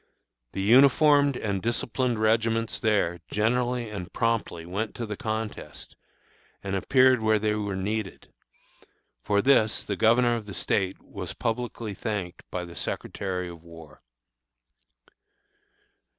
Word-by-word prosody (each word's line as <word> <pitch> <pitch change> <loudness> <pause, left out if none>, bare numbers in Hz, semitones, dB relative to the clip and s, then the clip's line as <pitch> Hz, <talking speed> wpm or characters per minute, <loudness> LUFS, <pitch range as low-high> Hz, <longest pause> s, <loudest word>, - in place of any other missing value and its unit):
The 95 - -2
uniformed 140 +4 +5
and 100 -3 -2
disciplined 120 +1 -1
regiments 115 +1 +1
there 100 -7 +1
generally 120 +1 0
and 90 -4 -6
promptly 115 -8 -1
went 100 +5 -4
to 120 - -4
the 105 -1 -5
contest, 110 +1 -5 0.7
and 100 -1 -2
appeared 130 +4 +4
where 110 0 +3
they 105 0 0
were 100 -2 -2
needed. 100 0 -4 0.9
For 100 0 +1
this 120 -5 +3
the 100 - -3
Governor 120 +4 +4
of 110 -3 -6
the 100 - -7
State 95 -2 0
was - - -7
publicly 115 -2 -3
thanked 95 -4 -4
by 90 -1 -4
the 85 0 -11
Secretary 90 -1 -4
of 85 -2 -10
War. 85 -2 -14
110 Hz, 125 wpm, -26 LUFS, 95-120 Hz, 0.9 s, uniformed